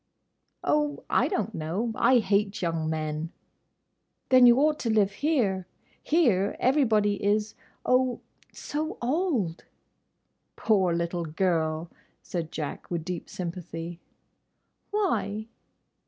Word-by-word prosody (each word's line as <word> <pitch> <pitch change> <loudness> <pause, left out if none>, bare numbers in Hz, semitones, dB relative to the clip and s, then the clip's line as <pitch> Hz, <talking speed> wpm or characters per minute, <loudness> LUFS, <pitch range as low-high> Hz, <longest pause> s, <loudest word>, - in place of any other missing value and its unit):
"Oh, 295 -1 0
I - - +3
don't 220 - -2
know. 175 +9 -2
I 260 +3 +4
hate 205 -1 +1
young 165 -2 -1
men." 155 +1 -3 1.0
"Then 255 -1 +8
you 240 0 +7
ought 300 +2 +3
to 235 - -2
live 210 -3 +3
here. 195 - 0 0.3
Here—everybody 220 - +2
is—oh!—so 250 +8 -2
old!" 250 - -1 0.9
"Poor 195 -5 +2
little 170 0 -2
girl," 160 -1 0 0.3
said 170 -2 -4
Jack, 150 -3 -5
with 170 -2 -3
deep 180 -2 -5
sympathy. 170 -1 -6 0.9
"Why?" 355 - -1
200 Hz, 95 wpm, -27 LUFS, 170-250 Hz, 1.0 s, Then